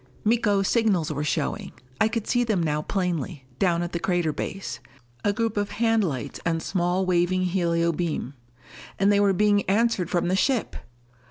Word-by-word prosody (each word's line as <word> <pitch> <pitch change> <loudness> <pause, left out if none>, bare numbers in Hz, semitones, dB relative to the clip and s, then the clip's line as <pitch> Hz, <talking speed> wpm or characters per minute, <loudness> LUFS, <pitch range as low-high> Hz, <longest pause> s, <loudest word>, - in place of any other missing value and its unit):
Miko's 210 -3 +2
signals 200 -10 +2
were 145 +1 -2
showing! 150 - -2 0.3
I 220 - +4
could 225 -1 -3
see 245 0 +2
them 215 -7 0
now 150 -1 0
plainly, 175 -5 -2
down 175 -3 +2
at 175 - -4
the 170 - -2
crater 175 -3 0
base. 195 +5 -5 0.4
A 205 - +3
group 225 0 -1
of 205 0 -1
hand 225 0 +2
lights 140 -9 -3
and 165 -1 -1
small 180 0 0
waving 185 +1 +2
helio 170 -2 +1
beam. 160 -5 -3 0.6
And 200 +1 +3
they 200 - +4
were 200 -1 +4
being 205 +1 +3
answered 205 -4 +2
from 175 -1 0
the 185 - +1
ship! 250 +4 0
185 Hz, 175 wpm, -25 LUFS, 170-205 Hz, 0.6 s, I